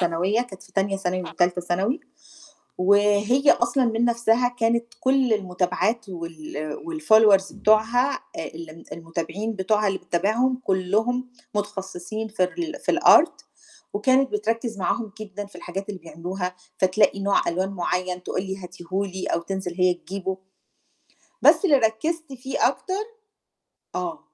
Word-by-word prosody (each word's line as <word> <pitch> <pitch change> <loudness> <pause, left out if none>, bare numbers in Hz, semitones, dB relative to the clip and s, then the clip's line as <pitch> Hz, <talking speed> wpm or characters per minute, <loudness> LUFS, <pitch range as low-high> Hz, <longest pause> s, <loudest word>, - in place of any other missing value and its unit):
ثانوية، 180 +5 +1
كانت 195 -6 -11
في - - -19
تانية 195 0 +1
ثانوي 185 -1 -2
وتالتة 180 +1 0
ثانوي، 195 - -1 0.8
وهي 205 +8 +4
أصلًا 240 +2 +2
من 230 +1 +1
نفسها 235 +1 +2
كانت 235 +1 +2
كُل 260 -2 +3
المُتابعات 190 +3 -1
وال 155 -4 -6
والfollowers 220 - +4
بتاعوها 220 +5 +3
آآ - - -8
الم 165 0 -10
المتابعين 170 +6 -4
بتوعها 210 +2 +1
اللي 195 -1 -1
بتتابعهم، 235 +9 0
كُلّهم 220 +7 0 0.3
متخصصين 205 +1 -4
في 210 -4 0
الر 320 - -3
في - - +2
الArt - - +6 0.5
وكانت 260 +6 +3
بتركِّز 230 - -1
معاهم 205 +3 -1
جدًا 205 -1 -6
في 200 - -19
الحاجات 195 +3 -6
اللي 195 -3 -5
بيعملوها، 180 +3 -5 0.2
فتلاقي 195 +2 +3
نوع 200 0 +2
ألوان 185 +3 0
مُعيّن 180 -1 -2
تقول 185 - -2
لي 190 -1 -5
هاتيه 180 -2 -11
لي، 190 -1 -2
أو - - 0
تنزل 190 0 -4
هي 180 0 +3
تجيبُه. 190 +2 -5 1.1
بس - - +6
اللي 310 -7 +6
ركِّزت 275 +7 -1
فيه 265 +1 +1
أكتر 400 +3 -3 0.9
آه، - - -3
200 Hz, 135 wpm, -24 LUFS, 180-235 Hz, 1.1 s, الArt